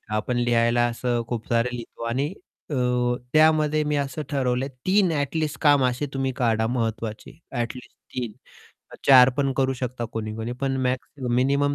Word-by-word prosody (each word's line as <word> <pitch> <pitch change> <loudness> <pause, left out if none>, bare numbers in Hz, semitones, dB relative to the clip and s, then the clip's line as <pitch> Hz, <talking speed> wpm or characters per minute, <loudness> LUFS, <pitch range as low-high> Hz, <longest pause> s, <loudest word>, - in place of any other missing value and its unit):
आपण 115 +3 -1
लिहायला 120 0 +2
असं 120 0 -1
खूप 115 -2 -4
सारे 115 +1 +2
लिहितो 120 -1 -9
आणि 130 +5 0 0.4
अ, - - -2 0.6
त्यामध्ये 155 -1 +4
मी 150 0 0
असं 140 +2 -2
ठरवलं 130 -2 0
आहे, 140 - -6 0.2
3 190 -1 +4
ॲट 145 +1 -1
लीस्ट 155 -2 -1
काम 145 -3 +5
असे 125 +3 0
तुम्ही 135 -1 -1
काढा 115 -3 +1
महत्त्वाचे, 115 +2 -3
ॲट 120 -3 -2
लीस्ट 125 0 -13 0.2
3. 120 -4 -3 0.7
4 130 -2 +9
पण 140 -2 +1
करू 135 -1 +2
शकता 125 -1 -3
कोणी-कोणी, 110 +1 -4
पण 135 -1 0
मॅक्स 125 0 -1 0.3
मिनिमम 140 +2 +2
125 Hz, 165 wpm, -24 LUFS, 120-140 Hz, 0.7 s, 4